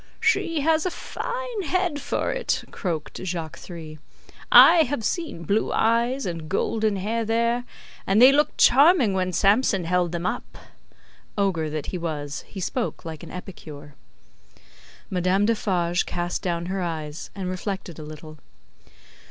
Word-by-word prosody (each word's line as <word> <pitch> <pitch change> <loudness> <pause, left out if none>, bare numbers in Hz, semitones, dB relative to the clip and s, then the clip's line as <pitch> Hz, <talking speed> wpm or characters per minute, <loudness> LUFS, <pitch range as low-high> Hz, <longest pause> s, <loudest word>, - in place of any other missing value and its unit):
"She 330 -3 +1
has 320 +3 +2
a - - +1
fine - - -5
head 345 -2 -1
for - - -1
it," - - -1
croaked 160 -6 -4
Jacques 170 -4 -4
Three. 160 -3 -9 0.5
"I - - +9
have 285 -7 +1
seen 325 - -3
blue 200 +7 0
eyes 235 +4 +1
and 165 -3 -5
golden 215 +2 0
hair 220 +4 -1
there, 235 +2 0 0.4
and 195 +3 +3
they 255 +3 +9
looked 295 +2 +1
charming 275 - +5
when 185 -1 0
Samson 200 +1 +3
held 175 0 +1
them 170 0 -3
up." - - -4 0.8
Ogre 180 -6 0
that 155 -1 -4
he 180 - -2
was, 145 -4 -4
he 195 - -8
spoke 225 +4 -3
like 160 -2 -7
an - - -10
epicure. 150 -6 -10 1.2
Madame 185 +2 +2
Defarge 180 -6 0
cast 175 0 -3
down 170 -2 -2
her 190 +1 -3
eyes, 160 -3 -5
and 190 -2 -4
reflected 185 -2 -5
a - - -7
little. 155 0 -10
190 Hz, 145 wpm, -24 LUFS, 170-240 Hz, 1.2 s, I